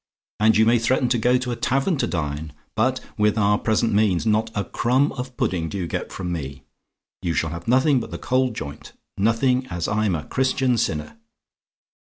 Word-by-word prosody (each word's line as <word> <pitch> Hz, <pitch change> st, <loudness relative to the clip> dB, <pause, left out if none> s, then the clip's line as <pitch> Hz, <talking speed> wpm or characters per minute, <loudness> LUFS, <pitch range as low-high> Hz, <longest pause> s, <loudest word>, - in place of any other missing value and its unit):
and 110 Hz, +1 st, +4 dB
you 110 Hz, -, +5 dB
may 115 Hz, +1 st, +4 dB
threaten 125 Hz, +2 st, +1 dB
to 120 Hz, -1 st, +1 dB
go 125 Hz, +2 st, +3 dB
to 125 Hz, 0 st, -3 dB
a -, -, -1 dB
tavern 135 Hz, +9 st, +1 dB
to 140 Hz, -, -1 dB
dine; 75 Hz, -2 st, -3 dB, 0.2 s
but, 130 Hz, +4 st, +1 dB, 0.2 s
with 105 Hz, +1 st, +3 dB
our 105 Hz, -1 st, +3 dB
present 110 Hz, 0 st, +1 dB
means, 100 Hz, -2 st, +2 dB
not 110 Hz, +1 st, +2 dB
a 100 Hz, -, 0 dB
crumb 130 Hz, +4 st, +1 dB
of 125 Hz, -1 st, -7 dB
pudding 95 Hz, -, -1 dB
do 100 Hz, -, -5 dB
you 90 Hz, -, -2 dB
get -, -, -4 dB
from 90 Hz, -2 st, -4 dB
me. 70 Hz, -5 st, -5 dB, 0.6 s
You 85 Hz, -2 st, -1 dB
shall 80 Hz, -, 0 dB
have 85 Hz, 0 st, -7 dB
nothing 130 Hz, +3 st, +4 dB
but 115 Hz, -, -6 dB
the -, -, -5 dB
cold 130 Hz, -2 st, 0 dB
joint 70 Hz, -6 st, -7 dB, 0.2 s
nothing 125 Hz, +5 st, +1 dB
as 85 Hz, -7 st, -3 dB
I'm 105 Hz, -3 st, +1 dB
a 75 Hz, -, -4 dB
Christian 130 Hz, -1 st, +1 dB
sinner. 75 Hz, -1 st, -2 dB
110 Hz, 200 wpm, -23 LUFS, 90-125 Hz, 0.6 s, you